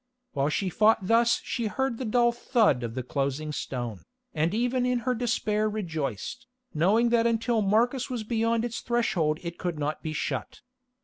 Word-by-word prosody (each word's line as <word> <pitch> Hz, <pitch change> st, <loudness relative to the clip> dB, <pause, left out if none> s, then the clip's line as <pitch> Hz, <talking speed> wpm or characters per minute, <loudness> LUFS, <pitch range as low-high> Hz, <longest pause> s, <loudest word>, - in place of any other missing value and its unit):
While 140 Hz, +1 st, +1 dB
she 185 Hz, +5 st, -1 dB
fought 215 Hz, +1 st, +3 dB
thus 230 Hz, +3 st, +3 dB
she 235 Hz, -3 st, -2 dB
heard 265 Hz, +1 st, -2 dB
the 260 Hz, -, -3 dB
dull 240 Hz, +2 st, +3 dB
thud 235 Hz, -, +2 dB
of 115 Hz, -1 st, -5 dB
the 130 Hz, -, -3 dB
closing 140 Hz, +3 st, -2 dB
stone, 120 Hz, -8 st, -4 dB, 0.3 s
and 160 Hz, +2 st, +1 dB
even 245 Hz, +4 st, 0 dB
in 250 Hz, -1 st, +1 dB
her 255 Hz, -, +2 dB
despair 215 Hz, -3 st, 0 dB
rejoiced, 165 Hz, -, -4 dB, 0.3 s
knowing 205 Hz, +10 st, +3 dB
that 235 Hz, 0 st, +3 dB
until 230 Hz, 0 st, +1 dB
Marcus 235 Hz, +6 st, +1 dB
was 245 Hz, -4 st, -3 dB
beyond 230 Hz, +1 st, 0 dB
its 235 Hz, -1 st, -4 dB
threshold 175 Hz, -10 st, +1 dB
it 170 Hz, 0 st, -6 dB
could 175 Hz, -3 st, -2 dB
not 150 Hz, +1 st, -2 dB
be 155 Hz, -, -4 dB
shut. -, -, -4 dB
215 Hz, 175 wpm, -27 LUFS, 155-235 Hz, 0.3 s, fought